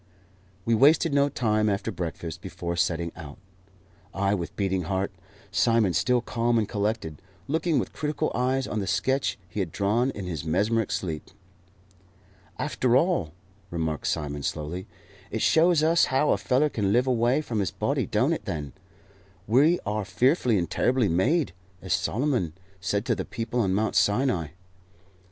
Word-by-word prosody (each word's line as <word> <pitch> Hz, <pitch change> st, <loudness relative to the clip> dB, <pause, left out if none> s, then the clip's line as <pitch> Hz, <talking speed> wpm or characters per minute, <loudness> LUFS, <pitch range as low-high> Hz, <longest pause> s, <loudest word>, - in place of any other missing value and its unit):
We 115 Hz, -, +2 dB
wasted 145 Hz, +6 st, +4 dB
no 140 Hz, 0 st, +3 dB
time 110 Hz, -4 st, +1 dB
after 100 Hz, +3 st, -1 dB
breakfast 85 Hz, -2 st, -5 dB
before 85 Hz, -2 st, -4 dB
setting 85 Hz, -1 st, 0 dB
out 75 Hz, -3 st, -9 dB, 0.8 s
I 100 Hz, +1 st, +1 dB
with 85 Hz, -4 st, -4 dB
beating 95 Hz, -3 st, -1 dB
heart, 95 Hz, +2 st, -1 dB, 0.4 s
Simon 115 Hz, -6 st, +3 dB
still 125 Hz, +8 st, +2 dB
calm 120 Hz, 0 st, 0 dB
and 110 Hz, -2 st, +1 dB
collected, 105 Hz, -7 st, -2 dB, 0.3 s
looking 160 Hz, +2 st, +1 dB
with -, -, -2 dB
critical 150 Hz, -1 st, -2 dB
eyes 130 Hz, +2 st, 0 dB
on 110 Hz, -, -3 dB
the 100 Hz, -, -3 dB
sketch 135 Hz, +7 st, 0 dB
he 85 Hz, +4 st, -6 dB
had 90 Hz, -5 st, -2 dB
drawn 105 Hz, -, +1 dB
in 100 Hz, -7 st, -6 dB
his 80 Hz, -6 st, -4 dB
mesmeric 105 Hz, +7 st, +1 dB
sleep. 80 Hz, -5 st, -3 dB, 1.3 s
"After 125 Hz, -1 st, +1 dB
all," 150 Hz, -, +1 dB, 0.4 s
remarked 80 Hz, -3 st, -2 dB
Simon, 75 Hz, 0 st, -2 dB
slowly, 80 Hz, +7 st, -4 dB, 0.4 s
"it 110 Hz, -, -2 dB
shows 165 Hz, -1 st, +4 dB
us 165 Hz, +2 st, +4 dB
how 135 Hz, +3 st, +2 dB
a -, -, +3 dB
feller 135 Hz, +4 st, +2 dB
can 100 Hz, -7 st, 0 dB
live 120 Hz, +4 st, +3 dB
away 125 Hz, +1 st, +2 dB
from 115 Hz, -7 st, -3 dB
his 95 Hz, -, 0 dB
body, -, -, -1 dB
don't -, -, +2 dB
it, -, -, -5 dB
then? 75 Hz, -3 st, -4 dB, 0.7 s
We 145 Hz, -, +4 dB
are 105 Hz, 0 st, -1 dB
fearfully 120 Hz, -, +2 dB
and 85 Hz, -2 st, 0 dB
terribly 125 Hz, +5 st, +1 dB
made, 125 Hz, -, +1 dB, 0.3 s
as 95 Hz, -, -2 dB
Solomon 120 Hz, -, 0 dB, 0.3 s
said 100 Hz, +3 st, -1 dB
to -, -, +2 dB
the -, -, -3 dB
people 115 Hz, +2 st, -3 dB
on 95 Hz, -5 st, +1 dB
Mount 110 Hz, +2 st, 0 dB
Sinai." 105 Hz, -, +2 dB
105 Hz, 160 wpm, -26 LUFS, 90-130 Hz, 1.3 s, wasted